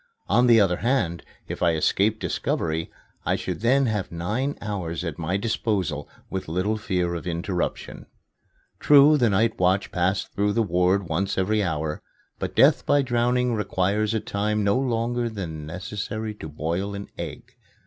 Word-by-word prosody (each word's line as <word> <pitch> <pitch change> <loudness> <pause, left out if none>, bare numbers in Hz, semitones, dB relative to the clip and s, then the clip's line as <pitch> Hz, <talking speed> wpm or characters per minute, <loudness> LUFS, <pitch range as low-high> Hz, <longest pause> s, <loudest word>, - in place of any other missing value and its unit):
On 125 +1 +4
the 115 -2 +7
other 95 -4 +3
hand, 95 - 0 0.3
if - - -6
I 85 -1 +3
escaped 105 +7 +2
discovery, 80 0 -2 0.3
I - - +1
should - - -4
then 135 +4 +3
have 105 -5 -2
nine 110 +12 -2
hours 90 -6 -4
at 85 -2 -5
my 85 +4 -1
disposal 100 -8 -1 0.2
with 95 -1 -5
little 90 +7 0
fear 90 -5 -1
of 85 +1 -5
interruption. 85 +1 -3 0.7
True, 145 +1 +7
the 120 -6 +3
night 110 +3 +1
watch 95 +2 +2
passed 90 +2 0
through 100 0 +1
the 115 - +2
ward 90 0 +1
once 95 +5 -1
every 105 +3 +1
hour. 80 -4 -2 0.4
But - - -4
death - - +5
by 145 -1 +3
drowning 125 0 +1
requires 105 +1 0
a - - +2
time 105 +1 -1
no 100 0 +3
longer 120 -1 0
than 80 -8 -6
that 80 - -7
necessary 105 +3 -4
to 80 -7 -8
boil 85 +7 -3
an 100 0 -7
egg. - - -7
100 Hz, 165 wpm, -24 LUFS, 90-115 Hz, 0.7 s, the